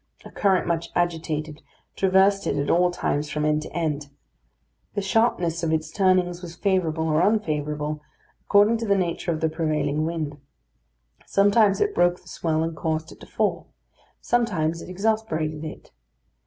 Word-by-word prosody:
A -, -, -10 dB
current, 195 Hz, -3 st, +2 dB
much 170 Hz, -1 st, -1 dB
agitated, 160 Hz, -3 st, -2 dB, 0.3 s
traversed 195 Hz, +1 st, +3 dB
it -, -, 0 dB
at 140 Hz, -, 0 dB
all 180 Hz, +1 st, +4 dB
times 150 Hz, -4 st, -2 dB
from 150 Hz, 0 st, -1 dB
end 150 Hz, 0 st, +2 dB
to -, -, -8 dB
end. 150 Hz, -4 st, -2 dB, 0.9 s
The 205 Hz, -, 0 dB
sharpness 190 Hz, -6 st, +1 dB
of 165 Hz, -2 st, 0 dB
its 155 Hz, 0 st, -1 dB
turnings 185 Hz, -2 st, +2 dB
was 170 Hz, -2 st, -8 dB
favourable 165 Hz, -4 st, 0 dB
or 155 Hz, +1 st, +2 dB
unfavourable, 150 Hz, -7 st, 0 dB, 0.4 s
according 210 Hz, +3 st, +4 dB
to 225 Hz, 0 st, -4 dB
the 200 Hz, 0 st, +3 dB
nature 175 Hz, -1 st, -1 dB
of 155 Hz, -, -3 dB
the 160 Hz, -, +3 dB
prevailing 155 Hz, -2 st, -1 dB
wind; 155 Hz, -3 st, -4 dB, 0.9 s
sometimes 205 Hz, 0 st, +4 dB
it 415 Hz, 0 st, +1 dB
broke 175 Hz, -, +2 dB
the -, -, -23 dB
swell 160 Hz, -1 st, -1 dB
and 165 Hz, 0 st, -3 dB
caused 160 Hz, +1 st, -2 dB
it -, -, -14 dB
to -, -, -13 dB
fall; -, -, -1 dB, 0.5 s
sometimes 180 Hz, -10 st, 0 dB
it -, -, -10 dB
exasperated 180 Hz, -6 st, -1 dB
it. 155 Hz, -, -9 dB
170 Hz, 160 wpm, -24 LUFS, 155-195 Hz, 0.9 s, all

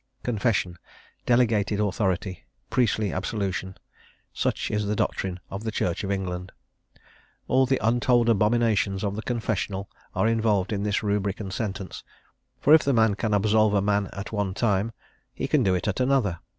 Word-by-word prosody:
Confession, 105 Hz, -6 st, 0 dB, 0.5 s
delegated 110 Hz, -4 st, +2 dB
authority, 95 Hz, -2 st, -1 dB, 0.3 s
priestly 110 Hz, -5 st, +1 dB
absolution, 95 Hz, -1 st, -3 dB, 0.6 s
such -, -, -1 dB
is 105 Hz, -1 st, -1 dB
the 105 Hz, -, 0 dB
doctrine 95 Hz, -2 st, -2 dB
of 100 Hz, +2 st, -5 dB
the 115 Hz, -, -2 dB
Church 90 Hz, -4 st, -1 dB
of 100 Hz, -, -3 dB
England: 95 Hz, -2 st, -3 dB, 1.0 s
all 130 Hz, 0 st, +3 dB
the 135 Hz, 0 st, +1 dB
untold 120 Hz, +1 st, +3 dB
abominations 110 Hz, -3 st, +2 dB
of 100 Hz, -1 st, -1 dB
the 110 Hz, -, -4 dB
confessional 105 Hz, -5 st, -3 dB, 0.2 s
are -, -, +2 dB
involved 110 Hz, -3 st, +1 dB
in 100 Hz, -, -1 dB
this 105 Hz, 0 st, 0 dB
rubric 100 Hz, -1 st, -1 dB
and 95 Hz, -3 st, -5 dB
sentence; 95 Hz, -2 st, -4 dB, 0.6 s
for 150 Hz, -, +5 dB
if 160 Hz, -, +8 dB
the 140 Hz, -, +1 dB
man 110 Hz, -3 st, +4 dB
can 110 Hz, +1 st, -2 dB
absolve 110 Hz, +1 st, +3 dB
a -, -, +4 dB
man 100 Hz, -1 st, +1 dB
at 100 Hz, -, -7 dB
one 100 Hz, -3 st, -2 dB
time, 105 Hz, 0 st, +1 dB, 0.4 s
he -, -, -2 dB
can 150 Hz, -, +3 dB
do 95 Hz, -5 st, +2 dB
it 90 Hz, -, -2 dB
at 105 Hz, -, -1 dB
another. 125 Hz, -10 st, +1 dB
105 Hz, 165 wpm, -25 LUFS, 95-115 Hz, 1.0 s, if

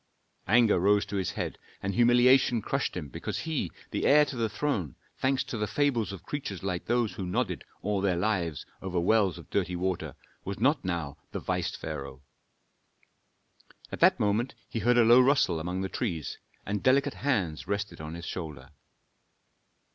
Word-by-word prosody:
Anger 115 Hz, -2 st, +5 dB
rose 100 Hz, +3 st, +3 dB
to 100 Hz, -, -6 dB
his 95 Hz, -3 st, -1 dB
head, -, -, -4 dB, 0.2 s
and 100 Hz, 0 st, -1 dB
humiliation 120 Hz, +2 st, +5 dB
crushed 130 Hz, 0 st, -2 dB
him 80 Hz, -5 st, -4 dB
because -, -, -4 dB
he, 160 Hz, -2 st, -2 dB, 0.2 s
the -, -, 0 dB
heir 150 Hz, +1 st, +7 dB
to 140 Hz, -, -6 dB
the 115 Hz, -2 st, 0 dB
throne, 105 Hz, -, -2 dB, 0.2 s
thanks 130 Hz, 0 st, +1 dB
to 115 Hz, -, -5 dB
the 105 Hz, -, 0 dB
fables 120 Hz, -9 st, +1 dB
of 95 Hz, -3 st, -8 dB
creatures 105 Hz, -, -5 dB
like 90 Hz, -2 st, -2 dB
those 120 Hz, -2 st, +1 dB
who 100 Hz, -, -5 dB
nodded 120 Hz, +8 st, -1 dB, 0.2 s
all 100 Hz, 0 st, 0 dB
their 95 Hz, -2 st, +2 dB
lives 85 Hz, -6 st, -1 dB, 0.2 s
over 90 Hz, -2 st, -2 dB
wells 95 Hz, 0 st, +3 dB
of 85 Hz, -1 st, -13 dB
dirty 90 Hz, -3 st, 0 dB
water, 90 Hz, 0 st, -2 dB, 0.3 s
was 100 Hz, 0 st, -5 dB
not 140 Hz, +5 st, +2 dB
now 85 Hz, -6 st, -3 dB, 0.2 s
the -, -, -2 dB
vice -, -, -2 dB
pharaoh. 70 Hz, 0 st, -6 dB, 1.7 s
At -, -, -5 dB
that -, -, +5 dB
moment 105 Hz, +5 st, 0 dB
he 115 Hz, -, -3 dB
heard 120 Hz, +2 st, +3 dB
a 120 Hz, -, +7 dB
low 120 Hz, +3 st, +8 dB
rustle 125 Hz, -, +3 dB
among 90 Hz, +3 st, -3 dB
the 95 Hz, -, -1 dB
trees, 90 Hz, -, -3 dB, 0.3 s
and 100 Hz, 0 st, -2 dB
delicate 140 Hz, +2 st, +3 dB
hands 100 Hz, -, 0 dB
rested 100 Hz, -4 st, -3 dB
on 80 Hz, +1 st, -6 dB
his 85 Hz, 0 st, -7 dB
shoulder. 75 Hz, -8 st, -6 dB
100 Hz, 175 wpm, -29 LUFS, 90-120 Hz, 1.7 s, low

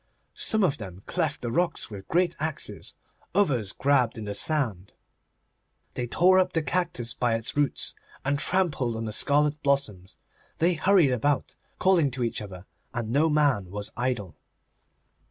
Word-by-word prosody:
Some 220 Hz, -2 st, +1 dB
of 150 Hz, -7 st, +1 dB
them 95 Hz, -2 st, -9 dB
cleft 160 Hz, -5 st, -2 dB
the 120 Hz, -, -2 dB
rocks 175 Hz, -3 st, -1 dB
with 100 Hz, -2 st, -9 dB
great 175 Hz, 0 st, +1 dB
axes; 155 Hz, 0 st, -4 dB, 0.4 s
others 130 Hz, -, +1 dB
grabbled 130 Hz, -3 st, +1 dB
in 110 Hz, -, -6 dB
the 105 Hz, -, -4 dB
sand. 110 Hz, -, -1 dB, 1.0 s
They 125 Hz, -, -3 dB
tore 185 Hz, +8 st, +4 dB
up 185 Hz, -1 st, +1 dB
the 165 Hz, -, 0 dB
cactus 150 Hz, -7 st, -1 dB
by 120 Hz, -2 st, 0 dB
its 115 Hz, +4 st, -2 dB
roots, 145 Hz, -2 st, +1 dB, 0.3 s
and 140 Hz, +1 st, 0 dB
trampled 155 Hz, -10 st, +1 dB
on 115 Hz, 0 st, -4 dB
the 110 Hz, -, -4 dB
scarlet 150 Hz, +4 st, +3 dB
blossoms. 110 Hz, -10 st, -1 dB, 0.4 s
They 175 Hz, +2 st, +3 dB
hurried 175 Hz, -3 st, +3 dB
about, 135 Hz, +3 st, 0 dB, 0.2 s
calling 180 Hz, -6 st, +3 dB
to 125 Hz, -, -1 dB
each 115 Hz, -, -2 dB
other, 95 Hz, -3 st, -9 dB, 0.3 s
and 115 Hz, -2 st, -3 dB
no 150 Hz, +5 st, +3 dB
man 140 Hz, -, +2 dB
was 100 Hz, +2 st, -6 dB
idle. 120 Hz, -7 st, -2 dB
140 Hz, 155 wpm, -26 LUFS, 115-160 Hz, 1.0 s, tore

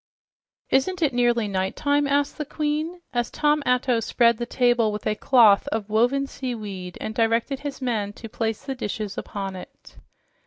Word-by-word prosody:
"Isn't 345 Hz, +7 st, +1 dB
it 285 Hz, -4 st, +2 dB
nearly 240 Hz, -2 st, +2 dB
nighttime?" 245 Hz, +10 st, 0 dB
asked 285 Hz, +2 st, 0 dB
the -, -, 0 dB
Queen 305 Hz, +4 st, -2 dB
as 240 Hz, -1 st, 0 dB
Tom 300 Hz, 0 st, +1 dB
Atto 250 Hz, -1 st, +2 dB
spread 235 Hz, 0 st, +2 dB
the 240 Hz, -, -3 dB
table 240 Hz, -3 st, +2 dB
with 210 Hz, 0 st, -6 dB
a 215 Hz, -, +2 dB
cloth 215 Hz, -2 st, +5 dB
of 215 Hz, -1 st, -3 dB
woven 245 Hz, +6 st, +2 dB
seaweed 210 Hz, -10 st, -6 dB
and 220 Hz, -, -4 dB
directed 230 Hz, +4 st, +1 dB
his 280 Hz, -2 st, -6 dB
men 215 Hz, -5 st, -1 dB
to 225 Hz, -, -9 dB
place 225 Hz, -1 st, -3 dB
the 270 Hz, -, -2 dB
dishes 210 Hz, -4 st, -4 dB
upon 195 Hz, -2 st, -5 dB
it. 185 Hz, -, -12 dB
240 Hz, 165 wpm, -24 LUFS, 215-275 Hz, -, cloth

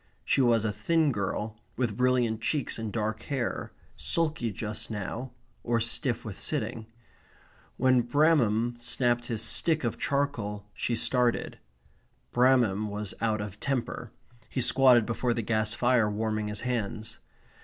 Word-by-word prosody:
She 140 Hz, -, +3 dB
was 115 Hz, -3 st, +3 dB
a 105 Hz, -, +1 dB
thin 160 Hz, +6 st, +1 dB
girl, 105 Hz, 0 st, -3 dB, 0.2 s
with 120 Hz, -5 st, 0 dB
brilliant 125 Hz, -3 st, +1 dB
cheeks 140 Hz, 0 st, -1 dB
and 110 Hz, -2 st, -4 dB
dark 110 Hz, 0 st, -2 dB
hair, 135 Hz, -4 st, -2 dB, 0.2 s
sulky 155 Hz, -8 st, 0 dB
just 105 Hz, +1 st, -5 dB
now, 110 Hz, +4 st, -5 dB, 0.3 s
or 120 Hz, -1 st, +1 dB
stiff 115 Hz, +1 st, 0 dB
with 105 Hz, -4 st, -6 dB
sitting. 110 Hz, -1 st, -2 dB, 0.9 s
When 130 Hz, -1 st, +4 dB
Bramham 120 Hz, -4 st, +2 dB
snapped 120 Hz, 0 st, 0 dB
his 110 Hz, -2 st, 0 dB
stick 155 Hz, +7 st, +3 dB
of 115 Hz, -, -2 dB
charcoal 115 Hz, -8 st, -1 dB
she 120 Hz, -, -1 dB
started. 125 Hz, 0 st, +1 dB, 0.7 s
Bramham 120 Hz, -5 st, +3 dB
was 105 Hz, -1 st, -4 dB
out 110 Hz, -2 st, +1 dB
of 105 Hz, 0 st, -7 dB
temper. 135 Hz, -4 st, -2 dB, 0.4 s
He -, -, -3 dB
squatted 125 Hz, -1 st, +5 dB
before 120 Hz, +1 st, -1 dB
the 115 Hz, -, -2 dB
gas 110 Hz, +1 st, 0 dB
fire 120 Hz, -3 st, +3 dB
warming 110 Hz, 0 st, -1 dB
his 105 Hz, 0 st, -3 dB
hands. 110 Hz, -2 st, -3 dB
115 Hz, 140 wpm, -28 LUFS, 110-125 Hz, 0.9 s, squatted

